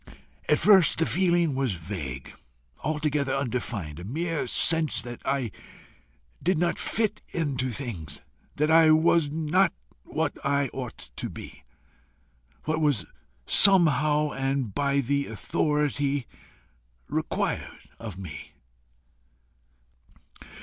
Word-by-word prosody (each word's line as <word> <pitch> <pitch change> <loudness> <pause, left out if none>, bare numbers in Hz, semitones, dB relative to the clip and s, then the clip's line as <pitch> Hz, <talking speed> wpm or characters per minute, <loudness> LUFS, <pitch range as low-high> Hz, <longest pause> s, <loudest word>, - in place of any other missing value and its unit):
At - - +5
first 195 -6 +6
the 165 - +3
feeling 175 -4 +2
was 130 -5 0
vague, 80 -7 -6 0.5
altogether 150 -2 0
undefined 120 - -3
a - - -8
mere 160 - -2
sense 160 -2 +2
that 120 0 -8
I 135 -5 -1 0.9
did 180 0 +1
not 170 +1 0
fit 215 -1 -1
into 140 -6 -1
things, 110 - -6 0.3
that 150 +2 +1
I 160 0 +7
was 160 0 +4
not 160 +5 +2 0.3
what 160 -2 -2
I 140 -1 +1
ought 125 -3 -7
to - - -3
be, - - -11 1.0
what 155 +1 -1
was 140 - +1 0.4
somehow 150 -5 +5
and 135 -5 -2
by 140 +2 +1
the 140 +2 -1
Authority 145 -2 0 0.8
required - - -3
of 105 -5 -7
me. 80 -7 -9
145 Hz, 110 wpm, -26 LUFS, 125-160 Hz, 1.0 s, I